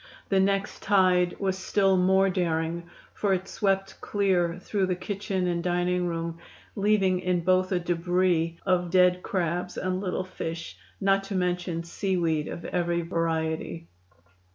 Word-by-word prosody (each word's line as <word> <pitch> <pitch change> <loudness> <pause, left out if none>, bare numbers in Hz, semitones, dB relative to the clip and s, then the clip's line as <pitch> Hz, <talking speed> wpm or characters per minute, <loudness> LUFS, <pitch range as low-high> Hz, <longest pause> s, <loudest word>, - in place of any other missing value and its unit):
The 195 - +3
next 195 +1 0
tide 185 -3 +3
was 190 -2 0
still 195 0 +2
more 190 +1 +4
daring, 170 -2 -1 0.2
for 200 -2 +1
it 185 +1 -5
swept 195 -1 -1
clear 180 -4 +1
through 190 +1 -1
the 180 - 0
kitchen 190 0 -3
and 175 -1 0
dining 180 0 +1
room, 165 -1 -3 0.4
leaving 195 -3 +2
in 180 -1 0
both 185 +2 +2
a 185 - +2
debris 175 -1 +1
of 180 -2 +1
dead 180 0 +4
crabs 180 -3 -2
and 185 0 -1
little 185 -1 -2
fish, 165 - -6 0.2
not 195 0 +2
to 195 - -4
mention 180 -2 -1
seaweed 170 -3 -1
of 170 - -7
every 175 -1 0
variety. 165 -1 -2
180 Hz, 145 wpm, -27 LUFS, 170-190 Hz, 0.4 s, more